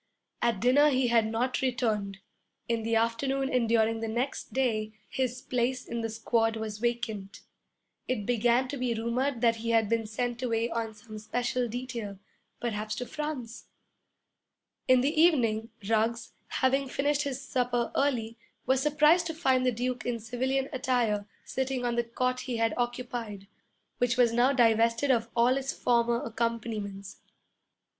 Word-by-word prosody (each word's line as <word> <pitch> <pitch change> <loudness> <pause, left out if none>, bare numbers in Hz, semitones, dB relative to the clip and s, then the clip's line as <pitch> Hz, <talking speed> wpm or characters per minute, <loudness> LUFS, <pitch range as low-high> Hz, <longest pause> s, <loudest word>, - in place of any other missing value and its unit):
At 235 -4 +1
dinner 270 +6 +5
he 260 -3 +2
had 230 -2 +3
not 240 +3 -1
returned. 220 -6 -1 0.5
In 230 -1 0
the 225 +1 0
afternoon 265 +4 0
and 240 -3 +2
during 225 0 +3
the 225 - -3
next 240 +5 -3
day 220 -5 0
his 255 -1 -2
place 250 +1 -1
in 235 0 -4
the 225 - -2
squad 225 0 +1
was 215 -1 -5
vacant. 230 -4 -3 0.7
It 215 -5 -1
began 240 +2 +2
to 280 - -4
be 250 -2 -1
rumored 235 +3 -1
that 230 -1 +3
he 230 +1 -4
had 225 -2 +3
been 225 -1 0
sent 240 +2 -3
away 230 -1 0
on 225 -1 -3
some 215 0 -10
special 245 +3 -1
detail, 235 -4 -5 0.4
perhaps 215 -2 -3
to 250 - -4
France. 290 -6 -5 1.2
In 255 -1 +6
the 300 +4 +2
evening 230 -10 +3 0.2
Ruggs, 225 +1 0 0.2
having 270 +1 +1
finished 285 +2 +1
his 275 -3 -3
supper 245 -3 -1
early, 235 -5 0 0.3
was 260 +1 +2
surprised 300 +4 +4
to 325 - -4
find 260 -6 +2
the - - +4
Duke 245 0 -2
in 240 -1 -2
civilian 260 +4 -1
attire 235 -6 0 0.2
sitting 265 -1 -2
on 240 -1 0
the 235 - +1
cot 255 +2 -1
he 250 -2 -3
had 225 -1 +1
occupied, 240 -4 -3 0.5
which 245 0 +1
was 240 -2 +4
now 245 +3 +4
divested 230 +1 +3
of 230 -2 +1
all 245 +2 +4
its 270 0 -2
former 235 -1 +1
accompaniments. 220 -4 -4
240 Hz, 155 wpm, -29 LUFS, 225-255 Hz, 1.2 s, In